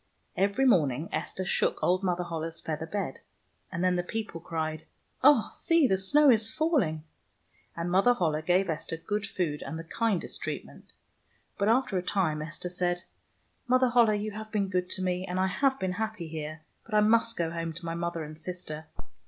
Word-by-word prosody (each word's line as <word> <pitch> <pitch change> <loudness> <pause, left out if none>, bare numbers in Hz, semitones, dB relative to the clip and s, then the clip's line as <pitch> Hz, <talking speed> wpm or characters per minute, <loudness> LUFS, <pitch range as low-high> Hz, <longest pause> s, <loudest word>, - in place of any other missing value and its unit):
Every 200 +7 +2
morning 155 - +3
Esther 185 - -3
shook - - +1
old 185 +2 +2
Mother 180 -1 0
Holle's 165 -1 -4
feather 160 0 -4
bed, 205 +4 -3 0.5
and 175 0 -2
then 180 -1 +3
the - - +2
people 195 -2 -5
cried, 160 -2 -3 0.2
" - - -36
Oh, 280 -5 +6
see, 330 -3 +3
the 195 - +3
snow 280 +10 +5
is 225 -1 +3
falling." 255 - +1 0.7
And 170 +1 -2
Mother 195 +7 +5
Holle 155 -6 0
gave 180 +4 +2
Esther 165 0 -3
good 205 +5 -3
food 155 -5 -2
and 160 - -5
the 165 - -6
kindest 210 +2 -1
treatment. - - -6 0.7
But 200 +1 +2
after 225 -5 +2
a - - -2
time 175 -5 0
Esther 170 +3 -4
said, 175 0 -1 0.3
" - - -42
Mother 255 0 +4
Holle, 230 -3 +5
you 210 +1 -3
have 215 +1 -8
been 200 -2 0
good 180 -1 -1
to 190 - -1
me, 180 0 0
and 185 -1 -3
I 190 - +3
have 265 +8 +1
been 190 -1 -1
happy 220 -3 -3
here, 155 0 -6 0.2
but 220 - -5
I 210 - +6
must 230 +2 +3
go 165 -1 0
home 165 -1 -3
to 170 +2 -8
my 165 - -2
mother 170 -1 -3
and 155 +1 -9
sister." 160 -3 -5
180 Hz, 195 wpm, -29 LUFS, 165-215 Hz, 0.7 s, Oh